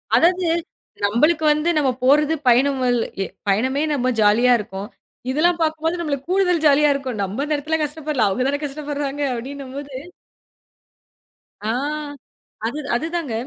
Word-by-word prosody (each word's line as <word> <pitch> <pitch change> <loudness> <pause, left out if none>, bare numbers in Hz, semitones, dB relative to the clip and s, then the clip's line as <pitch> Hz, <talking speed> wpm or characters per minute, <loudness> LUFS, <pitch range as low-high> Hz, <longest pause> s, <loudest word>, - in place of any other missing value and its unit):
அதாது, 360 +1 +3 0.6
நம்மளுக்கு 300 +10 +2
வந்து, 305 +3 0
நம்ம 280 -3 +2
போறது 300 +4 +4
பயணம், 265 +3 +4 0.4
எ - - -3 0.2
பயணமே 260 +8 +1
நம்ம 255 -2 +1
ஜாலியா 235 +4 +5
இருக்கும். 195 0 -6 0.4
இதுல்லாம் 340 +4 +2
பாக்கும்போது, 320 +2 0
நம்மளுக்கு 280 -2 -3
கூடுதல் 360 -4 +2
ஜாலியா 295 +1 +5
இருக்கும். 255 -6 -4
நம்ம 210 +9 -3
அந்த 300 0 0
இடத்துல 315 +2 -1
கஷ்டப்படல, 295 -6 -1
அவங்கதான 265 +7 0
கஷ்டப்படுறாங்க, 290 0 -4
அப்படின்னம்போது 275 +2 -7 1.7
ஆ, - - -1 1.0
அது, 290 +6 -4 0.2
அதுதாங்க. 325 -2 -2
285 Hz, 120 wpm, -21 LUFS, 255-310 Hz, 1.7 s, ஜாலியா